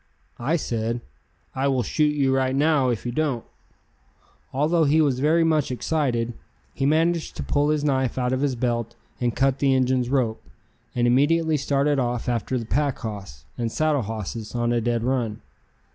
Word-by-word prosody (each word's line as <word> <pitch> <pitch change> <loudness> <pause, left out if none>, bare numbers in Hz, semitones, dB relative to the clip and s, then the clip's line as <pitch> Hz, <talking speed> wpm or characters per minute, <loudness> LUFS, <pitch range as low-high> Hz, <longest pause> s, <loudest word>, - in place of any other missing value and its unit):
I 140 +8 +1
said: 115 -5 -2 0.5
"I 135 +1 0
will 130 -3 +1
shoot 150 +6 +1
you 135 -2 +2
right 130 0 +1
now 145 -2 +3
if 120 -2 -2
you 120 - -1
don't." 135 -3 -1 1.1
Although 155 +4 +2
he 150 +3 +3
was 140 -5 +2
very 160 +4 +3
much 155 -3 +2
excited, 125 -3 -1 0.4
he 135 - 0
managed 165 +2 +1
to - - -4
pull 145 +1 +1
his 150 -1 +1
knife 130 -4 0
out 125 0 0
of 130 - -1
his 140 -3 +1
belt 120 -1 -2 0.2
and 120 -2 0
cut 135 0 +2
the 135 -2 +3
Injun's 130 -1 +1
rope, 125 -5 0 0.5
and 120 -1 +2
immediately 155 +6 +3
started 140 0 +1
off 120 -2 -1
after 120 +1 -1
the 115 - -4
pack 140 +3 0
hoss 100 - -7
and 115 -1 -1
saddle 155 -1 +1
hosses 110 +1 -5
on 120 0 +1
a 120 - +1
dead 120 0 0
run. 120 -4 -1
130 Hz, 175 wpm, -24 LUFS, 120-145 Hz, 1.1 s, now